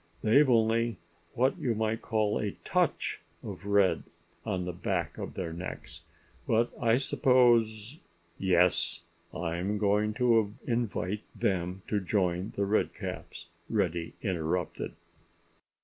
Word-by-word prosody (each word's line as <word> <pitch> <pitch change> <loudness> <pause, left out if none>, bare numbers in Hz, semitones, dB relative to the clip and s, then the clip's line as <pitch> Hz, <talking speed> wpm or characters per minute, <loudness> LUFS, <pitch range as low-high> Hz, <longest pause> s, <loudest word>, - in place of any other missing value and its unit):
They've 135 +6 +5
only 115 -1 +3 0.4
what 130 +3 +2
you 120 -3 0
might 110 +1 -1
call 110 -2 0
a 105 -2 -2
touch - - 0 0.2
of - - -7
red 100 -2 +3 0.4
on 90 -1 -2
the 90 - -3
backs 85 -2 -2
of - - -6
their 85 -3 -3
necks; 90 +3 -7 0.5
but 115 +1 +2
I 115 0 +4
suppose——" 120 -2 +3 0.4
"Yes! 90 -2 +2 0.3
I'm 90 +4 -2
going 105 +1 +1
to 115 -3 +3
invite 110 -4 -1
them 90 0 -1
to 105 - +1
join 95 -1 0
The 100 - +1
Redcaps," 105 +2 -3 0.2
Reddy 85 -6 -1
interrupted. 90 -5 -2
105 Hz, 115 wpm, -30 LUFS, 90-115 Hz, 0.5 s, They've